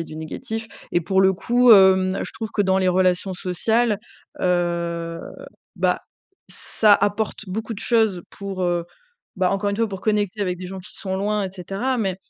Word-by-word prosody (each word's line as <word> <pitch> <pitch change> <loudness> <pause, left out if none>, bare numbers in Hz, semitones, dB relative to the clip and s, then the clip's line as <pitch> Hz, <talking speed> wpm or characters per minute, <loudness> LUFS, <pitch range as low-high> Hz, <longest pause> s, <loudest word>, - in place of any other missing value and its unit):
a - - -8
du 155 - -10
négatif 220 +8 -5 0.3
et 175 - +3
pour 190 +3 +1
le 190 0 +5
coup, 240 +5 +4
hem, 190 -1 +5
je - - -8
trouve 220 -2 -5
que - - 0
dans 190 -1 +2
les 185 -1 +2
relations 185 +1 +2
sociales, 210 +5 0 0.4
heu, 170 -1 -1 0.6
bah, - - +1 0.5
ça 215 -2 +2
apporte 205 +1 -1
beaucoup 220 +5 -4
de - - -8
choses 220 -7 +2
pour, 195 -2 -5
heu, 175 -1 0 0.5
bah, 185 -1 +2
encore 200 +1 0
une 200 - -2
fois, 225 0 +1
pour 195 -2 -6
connecter 210 -1 0
avec 180 -2 -2
des 185 - -6
gens 190 +1 -7
qui 180 - -11
sont 190 -1 -4
loin, 205 +1 0
et 190 - -4
cetera, 195 +8 -2
mais 190 -5 -1
190 Hz, 190 wpm, -22 LUFS, 180-210 Hz, 0.6 s, le